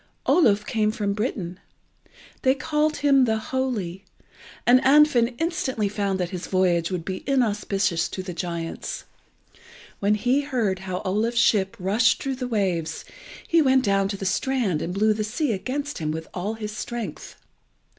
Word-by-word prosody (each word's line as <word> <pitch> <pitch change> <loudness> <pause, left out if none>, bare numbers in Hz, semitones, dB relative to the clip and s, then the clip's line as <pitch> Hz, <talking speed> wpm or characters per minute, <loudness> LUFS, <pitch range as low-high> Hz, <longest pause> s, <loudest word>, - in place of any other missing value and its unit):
Oluf 210 - +4
came 215 -2 +1
from 205 -2 -1
Britain. 200 -5 -3 0.8
They 260 0 +3
called 300 +2 0
him 275 -3 +4
the 220 -2 +1
Holy, 220 -7 -3 0.6
and 250 +1 +6
Andfind 265 -4 +4
instantly 260 -9 -1
found 200 -2 -1
that 180 -1 -2
his 180 -2 -5
voyage 175 -3 +2
would 180 -3 -4
be 190 -1 -4
inauspicious 200 -8 +1
to 185 - -5
the 185 -1 -6
giants. 170 -1 -4 1.0
When 205 +1 +2
he 250 +6 +2
heard 235 -10 -1
how 185 -1 -5
Oluf's 220 +5 0
ship 195 -4 +3
rushed 210 +6 +2
through 270 -2 -2
the 250 -1 -3
waves, 185 -8 -1 0.4
he 335 -1 +4
went 265 -2 +3
down 195 -1 +2
to 200 0 -4
the 195 - -5
strand 205 - 0
and 170 - -3
blew 215 +3 +2
the 215 0 -2
sea 245 +6 -1
against 280 +8 -3
him 155 -2 -2
with 160 +1 -4
all 200 +5 -3
his 215 -1 -6
strength. 225 -7 -6
210 Hz, 160 wpm, -24 LUFS, 190-255 Hz, 1.0 s, and